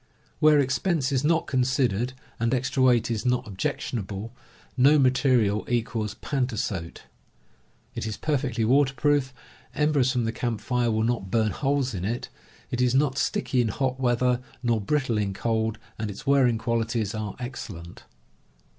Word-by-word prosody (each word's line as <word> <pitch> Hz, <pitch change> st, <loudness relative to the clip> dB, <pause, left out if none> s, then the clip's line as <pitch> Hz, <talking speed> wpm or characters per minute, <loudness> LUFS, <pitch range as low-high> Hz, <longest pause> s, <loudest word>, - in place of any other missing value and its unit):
Where 155 Hz, -1 st, +6 dB
expense 140 Hz, +2 st, +1 dB
is 135 Hz, 0 st, +1 dB
not 165 Hz, +2 st, +2 dB
considered, 125 Hz, -3 st, 0 dB, 0.3 s
and 115 Hz, +3 st, +1 dB
extra 130 Hz, +1 st, -1 dB
weight 120 Hz, -3 st, +4 dB
is 110 Hz, -2 st, -2 dB
not 125 Hz, -1 st, +1 dB
objectionable, 100 Hz, +2 st, -4 dB, 0.4 s
no 140 Hz, +4 st, +5 dB
material 125 Hz, -6 st, +3 dB
equals 115 Hz, -3 st, -1 dB
pantasote. 110 Hz, -, -2 dB, 0.9 s
It -, -, -4 dB
f 110 Hz, -, -3 dB
^^ -, -, -9 dB
perfectly 130 Hz, -7 st, 0 dB
waterproof, 135 Hz, +1 st, +2 dB, 0.4 s
embers 150 Hz, -4 st, +2 dB
from 125 Hz, -3 st, 0 dB
the 115 Hz, -, -1 dB
a -, -, -17 dB
erproo -, -, -19 dB
camp 115 Hz, -3 st, -2 dB
fire 125 Hz, -2 st, 0 dB
will 110 Hz, 0 st, +1 dB
not 115 Hz, -5 st, -1 dB
burn 110 Hz, 0 st, +1 dB
holes 135 Hz, -1 st, 0 dB
in 90 Hz, -3 st, -4 dB
it, 115 Hz, +5 st, -3 dB, 0.4 s
it 125 Hz, -, -1 dB
is 125 Hz, 0 st, +2 dB
not 140 Hz, -1 st, +2 dB
sticky 150 Hz, -, 0 dB
in 120 Hz, -, +1 dB
hot 130 Hz, +4 st, -1 dB
weather 125 Hz, 0 st, +2 dB, 0.2 s
nor 115 Hz, -3 st, +1 dB
brittle 130 Hz, -1 st, 0 dB
in 100 Hz, -2 st, -2 dB
cold, 110 Hz, 0 st, -1 dB, 0.2 s
and 110 Hz, -1 st, -2 dB
its 100 Hz, +8 st, -8 dB
wearing 135 Hz, -4 st, +4 dB
qualities 115 Hz, -1 st, -1 dB
are 110 Hz, -2 st, -4 dB
excellent. 105 Hz, -9 st, -8 dB
120 Hz, 160 wpm, -26 LUFS, 110-130 Hz, 0.9 s, Where